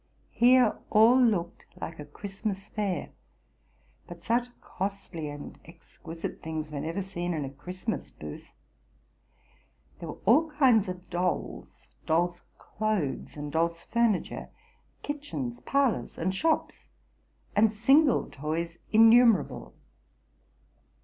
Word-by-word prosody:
Here 245 -1 +4
all 230 +4 +6
looked 190 -8 +1
like 165 -1 -6
a 150 - -6
Christmas 195 +5 -6
fair, 195 -7 -2 1.0
but 170 -1 -11
such 235 +3 +1
costly 190 -5 -5
and 145 0 -9
exquisite 165 0 -9
things 155 -1 -5
were 145 - -4
never 165 +6 -3
seen 175 -2 -3
in 150 -3 -2
a 135 - -7
Christmas 180 - -5
booth. 75 -1 -10 1.5
There 165 - -7
were - - -8
all 295 +10 +5
kinds 260 -9 +4
of 180 0 -7
dolls, 180 +1 -3 0.2
dolls' 175 +2 +1 0.2
clothes, 210 -11 -3
and 145 0 -5
dolls' 165 +2 0
furniture; 235 -5 0 0.5
kitchens, 280 -4 -4
parlors, 275 -4 0
and 185 +3 -1
shops, 320 +11 -1 0.7
and 215 +1 +5
single 270 +6 +4
toys 165 +4 -4
innumerable. 225 0 +5
190 Hz, 110 wpm, -28 LUFS, 165-230 Hz, 1.5 s, all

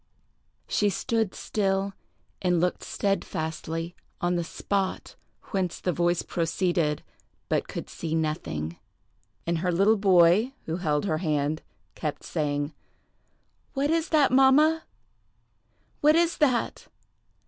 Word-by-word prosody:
She 205 - +2
stood 225 -1 -1
still, 195 -1 0 0.5
and 180 -2 +2
looked 180 +1 0
steadfastly 165 -3 -2 0.2
on 175 0 +1
the 170 - 0
spot 195 +3 -2 0.4
whence 185 -4 -1
the 180 - 0
voice 175 0 +1
proceeded, 170 -2 0 0.5
but - - +1
could - - -6
see 160 -1 -4
nothing; 85 - -2 0.7
and 170 -1 0
her 180 +1 0
little 200 +6 +4
boy, 195 +5 +5
who 165 +1 -2
held 150 -3 0
her 155 -5 0
hand, 155 -2 0 0.3
kept 150 -2 -4
saying, 145 -1 -2 1.0
"What 280 +2 +1
is 330 0 +1
that, 295 -5 +4
mamma? 290 +5 +5 1.1
What 300 +1 +5
is 340 0 +3
that?" 260 -6 +1
180 Hz, 115 wpm, -27 LUFS, 160-220 Hz, 1.1 s, boy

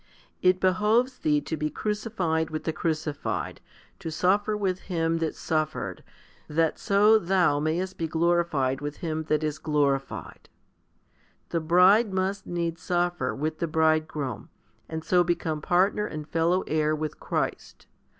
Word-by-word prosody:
It 185 0 +4
behoves 215 +7 +2
thee 150 -1 +2
to 160 - -4
be 150 0 -2
crucified 195 -6 -1
with 155 -1 -4
the 160 - -2
Crucified, 155 -2 -3 0.4
to 165 - -5
suffer 200 +6 +1
with 190 -3 -1
Him 165 -2 0
that 160 -2 -2
suffered, 155 -1 -2 0.4
that 160 +1 0
so 210 +2 +5
thou 180 -6 +2
mayest 170 +5 -2
be 165 - -1
glorified 160 -5 +1
with 145 0 -5
Him 160 -1 -2
that 155 0 +1
is 150 -1 -2
glorified. 135 - -1 1.0
The 170 - 0
bride 185 +7 +5
must 190 +1 -1
needs 170 -1 -3
suffer 175 -6 0
with 155 +2 -3
the 170 - 0
Bridegroom, 155 - 0 0.4
and 160 0 -4
so 180 +1 +3
become 165 -3 -1
partner 195 +5 +2
and 155 -1 -7
fellow 170 +3 +1
heir 155 0 +1
with 155 -1 -4
Christ. - - -3
165 Hz, 140 wpm, -26 LUFS, 155-185 Hz, 1.0 s, so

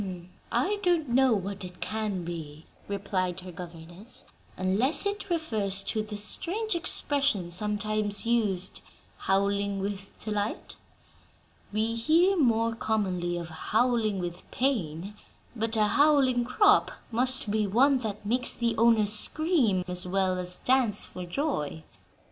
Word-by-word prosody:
"I 410 +2 0
don't 345 -7 +1
know 260 0 +4
what 195 0 -4
it 180 -1 -10
can 215 -4 -3
be," 160 -2 -7 0.2
replied 185 -2 -2
her 180 0 -9
governess, 175 +4 -11 0.3
"unless 205 - +1
it 405 -1 -3
refers 215 - -1
to 215 - -2
the 210 -1 -6
strange 370 - -2
expression 280 - +1
sometimes 210 +2 0
used, 210 -6 0 0.4
'howling 200 +1 0
with 195 0 -4
delight.' 210 -1 -4 1.0
We 220 +2 -1
hear 325 +11 +3
more 230 -7 +2
commonly 185 -6 -1
of 170 -1 -6
'howling 220 +4 0
with 175 -1 -6
pain,' 200 - -2 0.4
but 225 0 -2
'a 215 - +3
howling 270 -1 +3
crop' 410 - +4 0.2
must 250 -2 +3
be 215 -1 +1
one 260 +7 +3
that 215 -3 -5
makes 245 +4 +2
the 235 -1 -1
owner 225 -1 +4
scream, 215 - +2
as 180 0 +1
well 185 0 0
as 180 0 +4
dance 250 -5 +1
for 180 -1 -8
joy." 175 - -3
215 Hz, 130 wpm, -27 LUFS, 190-255 Hz, 1.0 s, know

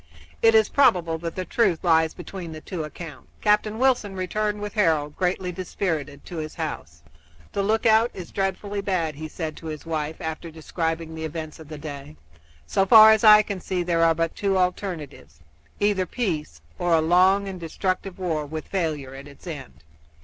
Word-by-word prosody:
It 225 0 +5
is 220 -1 +6
probable 170 -12 +3
that 165 0 -5
the 185 - -3
truth 195 -8 +1
lies 160 -2 +3
between 175 -1 -7
the 155 - -7
two 175 -2 -5
accounts. 150 -2 -9
Captain 210 +1 +2
Wilson 245 -6 +1
returned 210 +3 -2
with 205 0 -5
Harold, 160 -8 +1
greatly 180 0 -1
dispirited, 165 -5 -4
to 175 - -7
his 155 -1 -5
house. 80 - -6 0.5
"The - - -1
lookout 220 +2 +3
is 180 -3 -9
dreadfully 200 +1 -2
bad," 180 -6 -1
he 155 +2 -7
said 155 0 -5
to 165 - -9
his 155 0 -6
wife, 155 -1 -2
after 160 -1 -5
describing 160 0 -3
the 160 0 -6
events 155 0 -6
of 160 - -11
the 155 0 -8
day. 145 - -8 0.5
"So 135 - +2
far 220 +1 +10
as 220 0 +3
I 215 -1 +9
can 200 -3 -5
see 180 0 -2
there 170 -1 +1
are 165 -1 +4
but 165 0 -1
two 195 -2 0
alternatives 165 - -3 0.4
either 200 -3 +1
peace 160 - -3 0.2
or 175 -1 +3
a - - +4
long 185 +5 +4
and 190 -2 -6
destructive 185 +3 -3
war 160 -5 -2
with 155 +1 -6
failure 155 -8 -2
at 135 +1 -10
its 140 +4 -15
end. 80 - -8
170 Hz, 185 wpm, -24 LUFS, 155-195 Hz, 0.5 s, far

